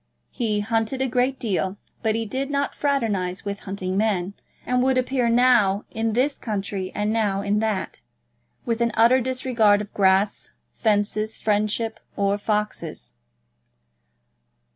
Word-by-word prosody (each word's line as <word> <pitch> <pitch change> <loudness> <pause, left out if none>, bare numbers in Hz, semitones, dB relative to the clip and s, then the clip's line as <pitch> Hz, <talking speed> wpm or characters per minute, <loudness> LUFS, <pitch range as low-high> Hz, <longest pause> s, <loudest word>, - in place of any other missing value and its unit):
He 215 -4 -1
hunted 225 +4 -1
a 265 - +1
great 255 +2 0
deal, 195 -3 -1 0.2
but 220 -2 +1
he 225 0 -1
did 265 +6 -3
not 280 0 -1
fraternise 210 -10 -1
with 200 0 -3
hunting 190 -1 -3
men, 200 -3 0 0.3
and 250 0 +1
would 260 0 +2
appear 255 -1 +1
now 230 -5 +4
in 225 0 -1
this 265 +5 +1
county 200 -3 -3
and 210 +1 0
now 205 -3 +1
in 205 +1 +1
that, 215 -3 -2 0.6
with 235 -1 -1
an 235 - +3
utter 240 +3 +5
disregard 245 -5 +2
of 210 -1 -7
grass, 195 +1 +2 0.2
fences, 215 0 0
friendships, 215 +1 -1 0.2
or 200 0 +1
foxes. 210 - -3
215 Hz, 140 wpm, -23 LUFS, 200-245 Hz, 0.6 s, utter